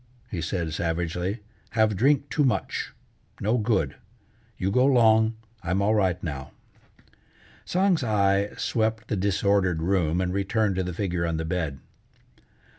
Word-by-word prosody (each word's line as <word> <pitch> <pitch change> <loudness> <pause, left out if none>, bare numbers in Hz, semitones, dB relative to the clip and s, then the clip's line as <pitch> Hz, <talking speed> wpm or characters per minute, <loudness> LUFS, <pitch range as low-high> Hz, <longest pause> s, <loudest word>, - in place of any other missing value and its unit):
he 90 - -3
said 80 -1 -2
savagely. 85 +5 -2 0.4
"Have 110 -1 +3
drink 140 +6 +2
too 150 - +2
much. 130 - -1 0.5
No 110 +5 +1
good. 100 - 0 0.6
You 95 +1 -1
go 125 +5 +3
'long, 110 -3 +4 0.3
I'm 90 +2 -1
all 100 +2 +2
right 95 -5 +2
now." 70 -5 -5 1.1
Tsang's 185 -4 +2
eye 100 -2 +2
swept 110 -1 -1
the - - 0
disordered 95 -3 +1
room 90 -2 +1
and 90 0 -1
returned 100 +1 0
to 95 - +1
the 90 - -3
figure 90 -3 -1
on 85 -1 -1
the 80 - -3
bed. 80 -5 -3
100 Hz, 140 wpm, -26 LUFS, 85-110 Hz, 1.1 s, long